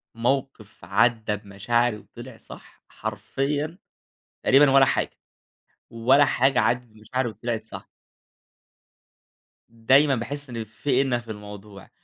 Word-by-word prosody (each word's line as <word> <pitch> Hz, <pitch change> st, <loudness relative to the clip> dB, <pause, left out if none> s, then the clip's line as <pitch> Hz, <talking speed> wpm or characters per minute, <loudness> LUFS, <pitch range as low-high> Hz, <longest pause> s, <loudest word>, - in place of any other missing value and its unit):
موقف 120 Hz, -2 st, -3 dB
عدى 110 Hz, +1 st, +2 dB
بمشاعري 105 Hz, +4 st, -1 dB
وطلع 120 Hz, +3 st, -12 dB
صح، -, -, -15 dB
حرفيًا 135 Hz, -, -3 dB, 0.7 s
تقريبًا 140 Hz, +1 st, +5 dB
ولا 135 Hz, 0 st, +6 dB
حاجة، 130 Hz, -, -1 dB, 0.7 s
ولا 130 Hz, +5 st, +4 dB
حاجة 135 Hz, -1 st, +2 dB
عدت 125 Hz, +1 st, +1 dB
بمشاعري 110 Hz, +3 st, -4 dB
وطلعت 115 Hz, 0 st, -4 dB
صح. 110 Hz, -, -10 dB, 1.8 s
دايمًا 130 Hz, +5 st, +3 dB
بأحس 145 Hz, +4 st, -5 dB
إن 115 Hz, -2 st, -4 dB
في 125 Hz, +5 st, -1 dB
إنَّ 130 Hz, -3 st, 0 dB
في 115 Hz, -1 st, -9 dB
الموضوع، 105 Hz, -1 st, -11 dB
120 Hz, 110 wpm, -24 LUFS, 110-135 Hz, 1.8 s, ولا